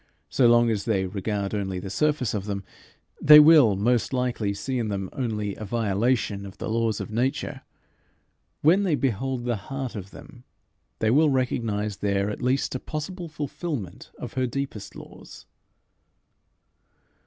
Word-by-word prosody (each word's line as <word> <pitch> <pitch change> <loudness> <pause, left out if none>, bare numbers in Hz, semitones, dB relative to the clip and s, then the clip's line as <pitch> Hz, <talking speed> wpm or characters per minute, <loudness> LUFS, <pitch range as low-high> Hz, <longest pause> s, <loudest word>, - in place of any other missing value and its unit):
So 125 - +4
long 120 0 +5
as 105 -2 -2
they 100 -5 +1
regard 100 +1 -3
only 95 -3 -2
the 95 +1 -6
surface 150 -4 0
of 100 -2 -3
them, 100 -1 -4 0.6
they 150 0 +10
will, 150 -9 +7
most 120 +6 +1
likely, 125 -5 -1
see 130 +6 -3
in 115 - -1
them 95 -2 -4
only 105 -6 -2
a - - -8
violation 105 0 0
of 100 0 -10
the - - -5
laws 115 -1 0
of - - -6
nature: 125 +5 -2 1.0
when 170 +7 +5
they 180 -6 +2
behold 130 -1 -2
the 120 -2 0
heart 135 -3 -4
of 100 -2 -7
them, 120 +4 -14 0.5
they 110 - +1
will 150 +4 +4
recognize 115 -6 -1
there 100 0 0
at - - -7
least 130 +2 0
a 130 - -3
possible 170 +6 -5
fulfilment 145 - -5
of - - -7
her 130 -1 0
deepest 130 -5 -5
laws. - - -12
115 Hz, 155 wpm, -25 LUFS, 100-135 Hz, 1.0 s, they